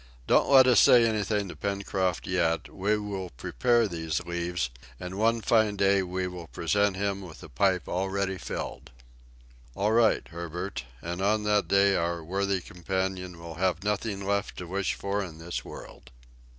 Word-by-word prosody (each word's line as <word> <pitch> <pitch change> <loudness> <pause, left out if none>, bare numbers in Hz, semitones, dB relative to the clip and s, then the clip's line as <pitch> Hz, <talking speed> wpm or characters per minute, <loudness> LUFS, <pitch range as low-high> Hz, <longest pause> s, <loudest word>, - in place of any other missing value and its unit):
"Don't - - +3
let 135 -2 +8
us 125 -2 +6
say 120 -2 +7
anything 105 -2 0
to 90 - -8
Pencroft 100 -3 -2
yet; 85 -3 0
we 105 +3 +1
will 100 -3 -4
prepare 120 - +1
these 80 -3 -2
leaves, 85 -5 -2 0.3
and 90 0 -6
one 115 +1 +2
fine 110 -2 +3
day 100 0 +3
we 95 0 -2
will 90 -2 -7
present 100 +5 +1
him 100 0 -1
with 85 -5 -11
a - - -10
pipe 90 +8 +1
already 95 +1 -1
filled!" - - -6 0.9
"All 105 +2 +1
right, 115 -1 +3
Herbert, 85 0 -5 0.2
and 85 +2 -4
on 105 +2 +2
that 105 -1 +2
day 100 0 +4
our 85 -1 -1
worthy 95 +2 -1
companion 90 0 -3
will 85 -1 -8
have 95 -1 +1
nothing 105 -1 -2
left 100 +1 -1
to 90 - -5
wish 95 +3 -1
for 100 +1 -2
in 80 -4 -9
this 85 +2 -5
world." - - -11
95 Hz, 165 wpm, -28 LUFS, 90-100 Hz, 0.9 s, let